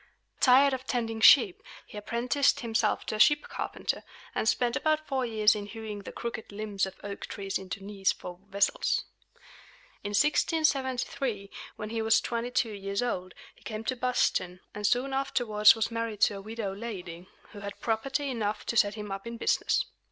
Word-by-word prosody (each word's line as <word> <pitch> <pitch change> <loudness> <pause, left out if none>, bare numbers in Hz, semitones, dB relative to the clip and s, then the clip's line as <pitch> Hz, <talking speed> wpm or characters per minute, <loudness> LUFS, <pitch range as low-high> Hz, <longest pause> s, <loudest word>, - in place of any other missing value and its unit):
Tired 270 +2 +6
of 260 0 -5
tending 225 -3 -2
sheep, 365 - +7 0.2
he - - -14
apprenticed 235 +6 +1
himself 225 -2 0
to - - -3
a - - -9
ship 295 +5 +6
carpenter, - - -3 0.3
and 220 - +1
spent 240 -1 +1
about 310 0 +1
four 265 -4 -1
years 215 -2 +4
in 205 -1 -5
hewing 220 -1 -6
the 200 - -8
crooked 235 -2 -6
limbs 200 -2 -2
of 190 - -9
oak 200 0 -6
trees 195 -1 -3
into 190 0 -7
knees 195 -1 0
for 180 0 -8
vessels. 200 +1 +1 1.0
In 205 - -3
1673, 260 -6 +1 0.2
when 215 +1 -6
he 225 -1 -1
was 220 0 +4
twenty 235 0 -3
two 245 -3 0
years 200 +2 -2
old, 185 -7 -3 0.2
he - - -25
came 215 -1 -5
to 255 - -1
Boston, 235 -7 0
and 210 0 -1
soon 260 +4 +1
afterwards 235 -6 +4
was 225 +1 -1
married 230 -2 -3
to 205 - +4
a - - -7
widow 215 -1 -4
lady, 185 -5 -7 0.2
who 205 - -10
had 200 0 -7
property 270 +5 -1
enough 215 -3 -2
to 235 - -2
set 205 -1 +4
him 210 -2 -6
up 195 +3 -5
in 235 0 -6
business. - - +1
220 Hz, 180 wpm, -29 LUFS, 205-250 Hz, 1.0 s, sheep